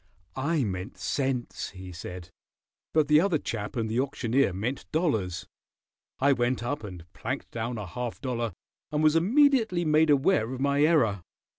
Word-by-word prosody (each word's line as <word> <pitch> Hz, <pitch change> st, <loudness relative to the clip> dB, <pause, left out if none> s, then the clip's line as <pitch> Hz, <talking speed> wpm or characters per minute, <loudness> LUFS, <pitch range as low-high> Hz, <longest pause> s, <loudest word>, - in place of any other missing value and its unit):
"I 145 Hz, +2 st, 0 dB
meant 95 Hz, -2 st, -4 dB
cents," 130 Hz, -3 st, -2 dB
he 95 Hz, -1 st, -10 dB
said, 90 Hz, 0 st, -8 dB, 0.6 s
"but 155 Hz, -2 st, +3 dB
the 150 Hz, +1 st, +6 dB
other 180 Hz, -3 st, +2 dB
chap 110 Hz, -7 st, -5 dB
and 115 Hz, -2 st, -1 dB
the 110 Hz, +3 st, -1 dB
auctioneer 130 Hz, -3 st, +1 dB
meant 110 Hz, +9 st, -4 dB
dollars. 110 Hz, -, 0 dB, 0.7 s
I 140 Hz, +2 st, +4 dB
went 120 Hz, -1 st, 0 dB
up 145 Hz, +3 st, -3 dB
and 90 Hz, -5 st, -8 dB
planked -, -, -5 dB
down 115 Hz, +1 st, -3 dB
a 105 Hz, -, -4 dB
half 120 Hz, +6 st, -5 dB
dollar 120 Hz, -5 st, -2 dB, 0.4 s
and 150 Hz, +1 st, 0 dB
was 155 Hz, 0 st, +5 dB
immediately 220 Hz, -, +3 dB
made 155 Hz, +1 st, +4 dB
aware 140 Hz, -, +3 dB
of 130 Hz, -, -5 dB
my 140 Hz, +1 st, +2 dB
error." 145 Hz, -, +3 dB
130 Hz, 160 wpm, -27 LUFS, 110-150 Hz, 0.7 s, the